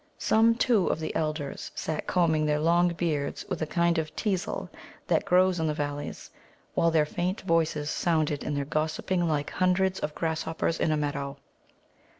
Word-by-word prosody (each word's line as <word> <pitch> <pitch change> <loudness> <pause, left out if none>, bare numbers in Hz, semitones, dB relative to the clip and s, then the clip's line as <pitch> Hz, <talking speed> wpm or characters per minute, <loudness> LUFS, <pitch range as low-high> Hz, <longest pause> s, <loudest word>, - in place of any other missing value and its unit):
Some, 225 +1 +4
too, 230 -5 +2
of - - 0
the 160 - -4
elders 155 -3 -3
sat 155 -1 -3
combing 160 -4 +2
their 150 0 +2
long 170 +3 +4
beards 155 -4 -2
with - - -3
a 155 - 0
kind 170 +1 +2
of 155 -1 -5
teasel 195 -4 -2 0.4
that - - +1
grows 180 0 +3
in 160 - +1
the 150 - -1
valleys, 145 -1 -4 0.4
while 170 - +3
their 160 -2 +3
faint 180 +5 -2
voices 160 -4 +1
sounded 155 -4 0
in 145 - -2
their 140 -1 -1
gossiping 160 +4 -1
like 150 -2 -1
hundreds 185 +1 +1
of 150 0 -4
grasshoppers 160 0 -1
in 155 - +2
a 155 - +2
meadow. 140 -1 -3
160 Hz, 170 wpm, -28 LUFS, 150-175 Hz, 0.4 s, Some